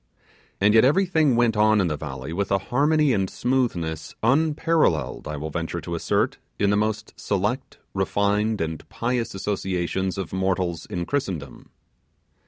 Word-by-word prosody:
And 105 +2 +4
yet 110 - +7
everything 160 -2 +3
went 120 -2 +3
on 110 0 +4
in 95 - +3
the 80 -3 -1
valley 65 0 -6
with 100 +3 -2
a 100 - +4
harmony 145 +7 +2
and 95 -3 0
smoothness 85 -12 -1
unparalleled, 150 - +2
I 75 -1 -4
will 75 +2 -5
venture 85 +2 -3
to 85 - -6
assert, 85 - 0 0.2
in 100 0 +2
the - - +3
most 105 0 -1
select, - - -2 0.2
refined, 105 +1 +1
and 80 -1 -4
pious 115 0 -2
associations 95 -1 -2
of 95 -3 -4
mortals 95 -3 -1
in 85 -1 -3
Christendom. 90 - -4
100 Hz, 150 wpm, -24 LUFS, 85-120 Hz, 0.2 s, yet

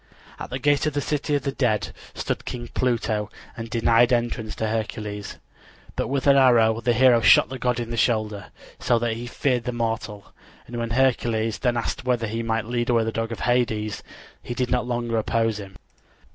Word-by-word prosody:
At - - -6
the 125 - -3
gate 145 +2 +2
of 155 - -1
the 145 - 0
City 150 +1 -1
of 140 - -1
the 140 - -1
Dead 120 -6 0 0.2
stood - - -3
King 120 -1 -6
Pluto, 110 -4 0 0.3
and 115 0 -7
denied 115 +1 +3
entrance 120 -2 -1
to 110 - -2
Hercules. 105 -2 -4 0.6
But - - -1
with 135 0 -1
an 140 -1 +6
arrow 115 -4 +4
the 120 0 +2
hero 120 -1 +5
shot 110 - +6
the 130 0 -6
god 125 -1 0
in 120 -1 -4
the 120 - -3
shoulder, 110 -4 0 0.3
so 120 - +2
that 115 0 -1
he 120 +2 -6
feared 125 -1 -1
the 125 - -1
mortal; 115 -3 -4 0.3
and 120 - -9
when 115 -1 -2
Hercules 115 -3 +1
then 120 -2 +1
asked 115 - -3
whether 125 -2 0
he 115 +1 -3
might 115 -1 -1
lead 120 +1 -2
away 115 -2 +3
the 110 - -2
dog 115 +1 -3
of 115 - -6
Hades 110 -4 0 0.4
he 120 - -6
did 125 0 -1
not 125 -1 0
longer 120 -2 -1
oppose 115 0 0
him. 95 -1 -10
115 Hz, 200 wpm, -24 LUFS, 110-125 Hz, 0.6 s, an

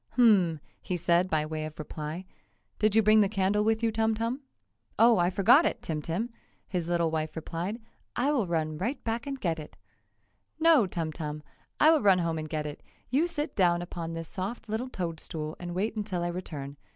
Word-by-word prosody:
"HMMM!" 195 -10 +5 0.2
he 180 - -2
said 175 +2 +2
by 155 -2 +1
way 155 0 -4
of 155 0 -7
reply, 155 +3 -6 0.5
"Did 215 0 +2
you 220 - +6
bring 215 +1 +6
the 200 - +3
candle 205 0 +1
with 220 +1 +1
you, 225 - +3
Tum 220 0 +1
Tum?" 230 +5 -2 0.6
"Oh, 230 -3 +6
I 175 0 +3
forgot 215 - +5
it, - - -1
Tim 155 -2 -2
Tim!" 185 +11 -2 0.4
his 175 -4 -2
little 170 -2 +1
wife 155 -1 -2
replied, 170 +7 -4 0.4
"I 270 +4 +2
will 245 -10 +1
run 155 -2 -1
right 245 +8 -2
back 230 +4 -2
and 275 -1 -4
get 165 -6 -1
it!" 150 - -10 0.8
"No, 320 -10 +5
Tum 165 -3 -3
Tum! 150 -1 -5 0.4
I 310 - +7
will 320 - +4
run 195 -3 +5
home 165 -2 -1
and 155 0 -6
get 155 -1 -2
it! 150 -1 -6 0.3
You 295 +7 +3
sit 300 -3 -4
down 175 -3 +3
upon 165 -1 -5
this 165 0 -5
soft 200 +6 -5
little 220 +4 -2
toad 170 -8 -4
stool 155 -1 -5
and 175 0 -5
wait 210 +5 -1
until 200 -5 -2
I 175 - -1
return. 145 -6 -6
180 Hz, 205 wpm, -29 LUFS, 160-225 Hz, 0.8 s, I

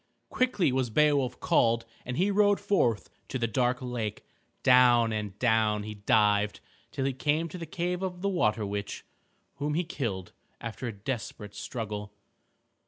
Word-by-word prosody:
Quickly 250 - +2
was 130 -1 0
Beowulf 140 +1 +2
called 115 0 +2 0.2
and 125 0 -3
he 195 +3 +2
rode 205 0 +4
forth 120 - +1 0.2
to 130 - -3
the 120 - 0
dark 125 +3 0
lake. 115 -4 -4 0.4
Down 120 -3 +6
and 105 -2 -4
down 110 -3 +2
he 105 0 -6
dived 105 0 +2 0.3
till 135 - -3
he 135 - 0
came 150 +5 0
to 180 - -8
the 165 - -6
cave 180 +3 -2
of 180 -1 -4
the - - +2
water 110 - +1
witch 100 0 -4 0.5
whom 150 +1 -1
he 175 - +1
killed 115 - -4 0.3
after 115 +2 -5
a - - -2
desperate 105 -1 -5
struggle. 105 -3 -5
120 Hz, 160 wpm, -29 LUFS, 105-150 Hz, 0.5 s, Down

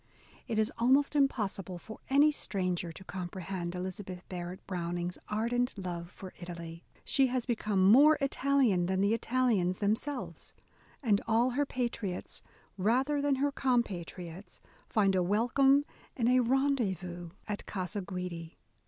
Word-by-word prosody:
It 225 - -2
is 220 0 +2
almost 270 +5 +3
impossible 200 - 0
for 220 +6 -10
any 285 +3 +6
stranger 180 - -2
to 190 - -11
comprehend 180 -1 -5
Elizabeth 185 0 -6
Barrett 180 0 -6
Browning's 175 -1 -3
ardent 235 +3 0
love 175 -3 -5
for 190 0 -10
Italy. 170 -1 -8 0.2
She 270 -1 +4
has 250 -1 -1
become 215 -5 +1
more 285 +10 +7
Italian 270 -9 +2
than 190 +1 +1
the 200 +2 +3
Italians 230 -7 +1
themselves," 225 +7 -3 0.5
and 210 -4 +3
all 230 +3 +3
her 285 +3 0
patriots 230 -8 -3 0.2
— - - -34
rather 270 +5 +2
than 285 -1 +2
her 285 +2 +1
compatriots 185 -8 -2 0.2
— - - -31
find 200 -3 +3
a 185 - +3
welcome 250 +9 +3 0.3
and 235 -3 +1
a 255 0 +5
rendezvous 225 - 0 0.2
at 210 -1 -4
Casa 195 +1 -3
Guidi. 180 -3 -6
205 Hz, 140 wpm, -31 LUFS, 180-255 Hz, 0.5 s, more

